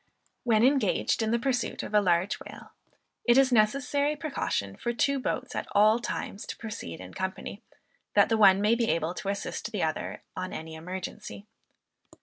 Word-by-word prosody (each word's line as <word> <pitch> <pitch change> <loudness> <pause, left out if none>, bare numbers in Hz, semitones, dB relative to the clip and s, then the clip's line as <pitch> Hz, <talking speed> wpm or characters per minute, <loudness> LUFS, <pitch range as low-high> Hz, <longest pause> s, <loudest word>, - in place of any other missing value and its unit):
When 225 -2 +3
engaged 270 -2 +2
in 220 - 0
the 235 - +2
pursuit 245 +1 -1
of - - -7
a 210 - +5
large 180 0 +1
whale, - - -11 0.5
it 240 +1 +4
is 270 -1 +5
a - - +2
necessary 275 +6 +2
precaution 270 - -2
for 240 - -3
two 280 +3 +1
boats - - -3
at - - -3
all 215 +3 +5
times 210 -3 -5
to - - -6
proceed 210 - -7
in 95 0 -10
company, 190 +2 -5 0.5
that - - +6
the 225 - +2
one 200 -3 +6
may 210 +2 +4
be 235 -1 +1
able 165 +1 0
to 195 - -5
assist 200 +2 -4
the 205 -6 -1
other, 155 -1 -3
on 185 0 -4
any 160 0 -6
emergency. 185 +5 -7
215 Hz, 180 wpm, -28 LUFS, 185-240 Hz, 0.5 s, that